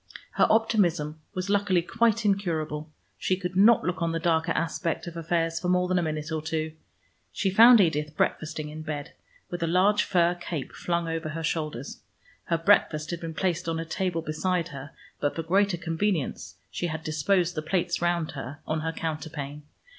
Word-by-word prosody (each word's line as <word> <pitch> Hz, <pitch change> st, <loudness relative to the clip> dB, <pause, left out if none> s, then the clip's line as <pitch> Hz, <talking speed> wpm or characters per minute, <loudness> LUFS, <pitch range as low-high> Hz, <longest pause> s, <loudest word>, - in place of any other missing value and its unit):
Her -, -, +3 dB
optimism 175 Hz, -9 st, +2 dB
was 185 Hz, +1 st, -2 dB
luckily 200 Hz, -3 st, +2 dB
quite 230 Hz, +2 st, +1 dB
incurable: 160 Hz, -6 st, -1 dB, 0.3 s
she 185 Hz, -, +1 dB
could 180 Hz, -1 st, -4 dB
not 210 Hz, +4 st, +6 dB
look 180 Hz, 0 st, -2 dB
on 165 Hz, -1 st, 0 dB
the 165 Hz, -, -1 dB
darker 165 Hz, 0 st, +1 dB
aspect 165 Hz, 0 st, -2 dB
of 170 Hz, -1 st, -7 dB
affairs 165 Hz, 0 st, 0 dB
for 180 Hz, -, -2 dB
more 180 Hz, 0 st, +3 dB
than 185 Hz, 0 st, +2 dB
a -, -, +1 dB
minute 155 Hz, -1 st, -3 dB
or 160 Hz, -1 st, -1 dB
two. 155 Hz, 0 st, -2 dB, 0.6 s
She 195 Hz, -, 0 dB
found 230 Hz, +4 st, +8 dB
Edith 150 Hz, -4 st, +1 dB
breakfasting 155 Hz, -1 st, -1 dB
in 155 Hz, +1 st, -7 dB
bed, 150 Hz, -2 st, -5 dB, 0.4 s
with 175 Hz, -, -4 dB
a 165 Hz, -, +1 dB
large 195 Hz, +5 st, +4 dB
fur 175 Hz, -1 st, +3 dB
cape 175 Hz, -4 st, -5 dB
flung 170 Hz, -1 st, -2 dB
over 165 Hz, -1 st, -3 dB
her 165 Hz, +1 st, -5 dB
shoulders. 155 Hz, -5 st, -3 dB, 0.5 s
Her 170 Hz, -, +1 dB
breakfast 165 Hz, -3 st, +3 dB
had 170 Hz, -, -3 dB
been 165 Hz, -1 st, -6 dB
placed 175 Hz, -2 st, -1 dB
on 165 Hz, 0 st, -1 dB
a 165 Hz, -, -3 dB
table 165 Hz, -1 st, -2 dB
beside 170 Hz, +2 st, -1 dB
her, 140 Hz, -1 st, -8 dB, 0.3 s
but 145 Hz, -, 0 dB
for 165 Hz, -, -3 dB
greater 190 Hz, +2 st, +2 dB
convenience 165 Hz, -, -2 dB, 0.2 s
she 175 Hz, -, -2 dB
had 160 Hz, -1 st, -4 dB
disposed 170 Hz, +4 st, +1 dB
the 155 Hz, -, -3 dB
plates 175 Hz, +2 st, -1 dB
round 175 Hz, -2 st, 0 dB
her, 140 Hz, 0 st, -7 dB
on 155 Hz, 0 st, -1 dB
her 160 Hz, +1 st, -2 dB
counterpane. 155 Hz, -3 st, -5 dB
165 Hz, 185 wpm, -27 LUFS, 155-180 Hz, 0.6 s, found